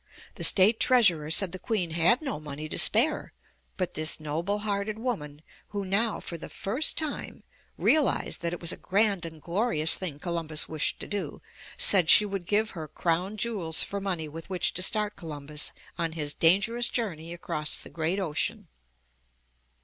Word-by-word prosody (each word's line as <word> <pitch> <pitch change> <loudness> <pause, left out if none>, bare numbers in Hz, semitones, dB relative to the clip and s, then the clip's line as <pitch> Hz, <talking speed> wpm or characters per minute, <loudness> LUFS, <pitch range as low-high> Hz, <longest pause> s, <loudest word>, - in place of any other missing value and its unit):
The - - -7
State 210 +4 +5
Treasurer 180 -12 +3
said 185 +2 +5
the 185 - -7
Queen 185 -5 -2
had 170 - +3
no 270 - -4
money 150 0 -7
to - - -6
spare, 270 +8 +4 0.4
but 185 -2 -3
this 155 +1 +2
noble 165 +7 -2
hearted 205 +1 -2
woman, 155 - -5 0.2
who 200 -1 -5
now, 205 +4 +1
for 170 - -7
the - - -9
first 255 +11 -2
time, 310 -2 -5 0.3
realized 305 -3 +2
that 170 -1 -2
it 175 - -5
was 170 0 +2
a - - -4
grand 195 -3 +1
and 160 -1 -12
glorious 170 -2 +1
thing 170 -7 -5
Columbus 160 -1 -1
wished 155 -2 -1
to - - -5
do, 205 -1 -5 0.4
said 180 -5 +5
she 210 - +8
would 195 -3 -5
give 215 +2 +1
her 160 -3 -7
crown 175 +6 -2
jewels 195 -8 0
for 200 0 -5
money 180 -5 -3
with 165 +4 -10
which 185 -2 0
to 185 - -3
start 210 +2 +1
Columbus 150 -2 -4 0.3
on 165 -1 -1
his 150 -3 -2
dangerous 200 +8 +3
journey 170 -9 -4
across 155 -3 -1
the - - -9
great 170 +4 -2
ocean. 190 +3 -2
180 Hz, 170 wpm, -27 LUFS, 160-210 Hz, 0.4 s, she